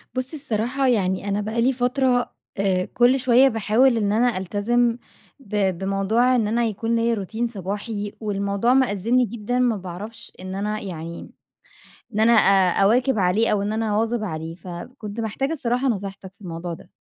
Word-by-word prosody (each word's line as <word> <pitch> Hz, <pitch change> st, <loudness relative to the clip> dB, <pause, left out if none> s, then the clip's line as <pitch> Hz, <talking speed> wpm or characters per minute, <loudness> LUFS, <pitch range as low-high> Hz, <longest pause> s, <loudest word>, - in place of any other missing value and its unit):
بُص، 255 Hz, +4 st, -3 dB
الصراحة 265 Hz, -2 st, -1 dB
يعني، 200 Hz, -4 st, +1 dB
أنا 200 Hz, +1 st, 0 dB
بقى 220 Hz, +3 st, -2 dB
لي 260 Hz, +3 st, +3 dB
فترة، 250 Hz, 0 st, +1 dB, 0.3 s
آآ 190 Hz, -2 st, +1 dB
كُل 250 Hz, +2 st, +3 dB
شويَّة 255 Hz, +1 st, +5 dB
باحاول 230 Hz, +2 st, +3 dB
إن 205 Hz, -2 st, +1 dB
أنا 230 Hz, 0 st, +2 dB
ألتزم 230 Hz, +5 st, +1 dB, 0.4 s
ب 200 Hz, -6 st, -1 dB
بموضوع 195 Hz, +7 st, +1 dB
إن 225 Hz, -4 st, +1 dB
أنا 235 Hz, +2 st, +1 dB
يكون 225 Hz, +1 st, -1 dB
ليّا 230 Hz, 0 st, +2 dB
روتين 220 Hz, +3 st, -2 dB
صباحي، 205 Hz, 0 st, -5 dB
والموضوع 200 Hz, +2 st, 0 dB
مأزِّمني 245 Hz, -1 st, +2 dB
جدًا، 235 Hz, +2 st, -3 dB
ما 245 Hz, -3 st, +2 dB
باعرفش 200 Hz, +5 st, -8 dB
إن 185 Hz, +1 st, -6 dB
أنا 210 Hz, +2 st, -2 dB
يعني، 170 Hz, -3 st, -7 dB, 0.9 s
إن 210 Hz, -, 0 dB
أنا 225 Hz, +2 st, +5 dB
أ 195 Hz, -5 st, +4 dB
أواكِب 245 Hz, +5 st, +3 dB
عليه 195 Hz, +4 st, +2 dB
أو 205 Hz, -1 st, +1 dB
إن 205 Hz, +1 st, -2 dB
أنا 220 Hz, 0 st, -1 dB
أواظِب 225 Hz, +1 st, 0 dB
عليه، 160 Hz, -3 st, -5 dB
فكنت 205 Hz, +6 st, -8 dB
محتاجة 230 Hz, +7 st, -2 dB
الصراحة 255 Hz, -3 st, 0 dB
نصيحتك 195 Hz, -4 st, -4 dB
في -, -, -52 dB
الموضوع 170 Hz, 0 st, -5 dB
ده. -, -, -15 dB
215 Hz, 165 wpm, -23 LUFS, 195-240 Hz, 0.9 s, شويَّة